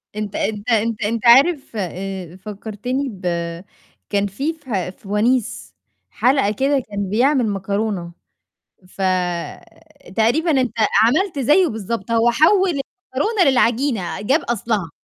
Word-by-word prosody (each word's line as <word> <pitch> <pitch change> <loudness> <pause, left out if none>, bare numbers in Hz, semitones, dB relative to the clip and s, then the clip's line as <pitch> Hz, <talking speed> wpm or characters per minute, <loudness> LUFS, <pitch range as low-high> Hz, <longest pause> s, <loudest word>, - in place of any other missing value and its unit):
أنت 210 -1 -4
أنت 210 +1 -2
أنت 225 0 +1
أنت 230 +3 -2
عارف 275 +5 +5
آآ 185 -2 -5
فكّرتني 215 +7 -4
ب 195 -4 -11 0.9
كان 205 0 +1
في 275 +12 -3
فه 230 - -4
في 190 - -15
ونيس 235 +3 0 0.3
حلقة 255 -4 +2
كده 270 +6 +1
كان 200 -2 -3
بيعمل 250 +3 +2
مكرونة، 200 -2 -2 0.8
فتقريبًا 190 - -2
أنت 255 - -2 0.3
عملت 305 - +2
زيّه 300 +8 +4
بالضبط 225 - -4
هو 230 +1 +3
حوّل 365 - +4
المكرونة 280 - -1
للعجينة 240 -6 0
جاب 270 +10 +2
أصلها. 215 -6 -2
230 Hz, 115 wpm, -20 LUFS, 200-270 Hz, 0.9 s, عارف